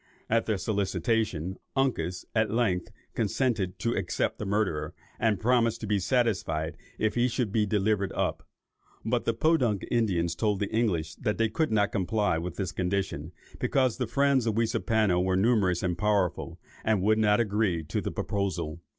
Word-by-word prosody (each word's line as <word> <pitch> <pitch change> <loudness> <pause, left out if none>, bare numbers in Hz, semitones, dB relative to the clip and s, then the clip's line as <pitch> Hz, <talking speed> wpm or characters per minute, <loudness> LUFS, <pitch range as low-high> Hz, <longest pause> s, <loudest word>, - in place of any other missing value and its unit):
At 115 0 +2
their 110 -3 +1
solicitation, 100 -2 -1 0.2
Uncas 90 -10 0
at 110 -1 +2
length 100 -6 0 0.2
consented 105 -4 0
to 115 - -1
accept - - -1
the 105 - -3
murderer, 95 -8 -1 0.2
and 110 -3 +2
promised 115 -1 +2
to - - -3
be 105 -1 +1
satisfied 90 - 0 0.2
if 110 - +1
he 120 +1 +2
should 120 -3 -1
be 105 -1 +1
delivered 100 -1 +1
up; - - -1 0.6
but - - 0
the 115 - +1
Podunk 120 - +2
Indians 90 -8 +1
told 105 +2 0
the 100 - -3
English 85 -9 0
that 105 -3 -1
they 115 -1 +2
could 135 +5 0
not 105 -1 +2
comply 100 -4 0
with 85 0 -5
this 95 -3 -3
condition, 90 -5 -2 0.3
because 130 -4 +1
the 125 -3 -1
friends 135 0 +2
of 110 - +1
Weaseapano 110 -4 +2
were 95 0 +1
numerous 95 -4 +2
and 90 -2 0
powerful, 100 -2 0 0.2
and 110 -4 +1
would 110 +2 +3
not 105 0 +4
agree 105 -6 +1
to - - -2
the - - -3
proposal. 85 -5 -2
105 Hz, 170 wpm, -28 LUFS, 90-115 Hz, 0.6 s, not